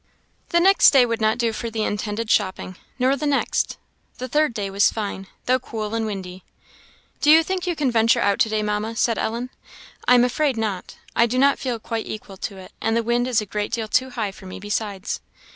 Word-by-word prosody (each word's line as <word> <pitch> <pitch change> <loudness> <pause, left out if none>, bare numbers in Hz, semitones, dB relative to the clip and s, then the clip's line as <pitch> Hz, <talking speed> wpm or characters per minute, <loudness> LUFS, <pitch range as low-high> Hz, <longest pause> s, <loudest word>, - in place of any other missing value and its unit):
The 340 - +3
next 390 +3 +6
day 265 -3 +5
would 230 -1 -2
not 215 +1 +2
do 235 -2 0
for 230 +1 -4
the 220 -1 -2
intended 210 +2 -2
shopping, 185 -2 0 0.2
nor 260 +1 +2
the 295 +2 -2
next. 285 -1 0 0.4
The 255 - -5
third 300 +2 +2
day 205 -4 -4
was 200 +1 +3
fine, 200 -3 -5 0.2
though 255 +1 +3
cool 220 -3 -5
and 225 -1 -1
windy. 190 -3 -6 0.8
"Do 295 - +3
you 320 +2 +8
think 370 +1 -3
you 350 - 0
can 285 -5 0
venture 230 0 +3
out 200 -1 +1
to 220 - +3
day, 215 0 0
Mamma?" 210 +2 -2
said 230 0 +1
Ellen. 235 +3 -3 0.6
"I 250 - +7
am 245 - +6
afraid 265 +1 +1
not. 210 -5 -3 0.2
I 235 - +4
do 250 +2 -2
not 275 +1 +4
feel 250 -3 -2
quite 225 0 -4
equal 200 -2 -7
to 195 +1 -5
it, 185 -1 -12
and 225 +1 +1
the 230 - +1
wind 240 +2 +1
is 240 -4 +2
a - - -5
great 205 +1 -3
deal 225 -2 -1
too 255 +4 +1
high 225 -5 -3
for 190 0 -13
me, 185 - -8
besides." 205 -1 -3
225 Hz, 225 wpm, -22 LUFS, 210-255 Hz, 0.8 s, you